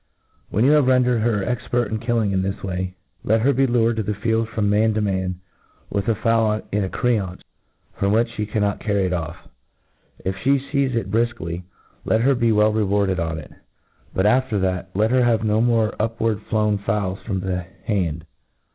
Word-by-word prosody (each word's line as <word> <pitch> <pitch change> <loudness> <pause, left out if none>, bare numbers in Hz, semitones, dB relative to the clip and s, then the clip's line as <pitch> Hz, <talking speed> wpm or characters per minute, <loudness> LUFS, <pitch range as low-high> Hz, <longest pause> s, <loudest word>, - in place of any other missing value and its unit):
When 110 +5 +2
you 140 - +5
have 150 -3 +4
rendered 125 -2 +3
her 110 -3 +1
expert 120 0 -1
in 110 - -1
kill 120 0 0
ing 100 -3 +1
this 95 +1 -3
way, 90 -1 -3 0.3
let 110 +1 +2
her 140 +4 +3
be 135 +1 +2
lured 115 -2 +2
in 110 - -1
the 105 - -1
field 110 +2 0
from 110 -2 -1
man 105 +2 +2
to 110 - +1
man, 95 -2 -1 0.6
with 100 +2 -1
a 115 - +2
fowl 115 -1 +2
in 105 0 +1
a 95 - -2
creance, 100 -7 -1 0.6
firom 100 0 +2
which 115 +2 +1
flie 105 - -2
carmot 105 -2 0
carry 100 -3 0
it 90 - -1
off. 80 -3 -5 0.8
If 95 - 0
fhe 140 +1 +2
feize 140 -3 +1
it 105 -4 -2
brilkly, 105 -7 -1 0.4
let 110 - +2
her 135 +3 +4
be 120 -2 +2
well 105 0 +3
rewarded 100 -3 +1
01? 80 -1 -2
it; - - -14 0.6
but, 95 - 0
af 130 +5 +3
ter 105 - 0
that, 95 -1 -1
let 110 +3 +2
her 130 -1 +4
have 115 -2 +2
no 110 0 +2
more 115 -2 +2
upward 110 -1 0
flown 105 -2 +1
fowls 100 -1 -1
from 95 -4 -3
the 90 -2 -3 0.2
hand. 85 -7 -1
110 Hz, 200 wpm, -22 LUFS, 95-115 Hz, 0.8 s, you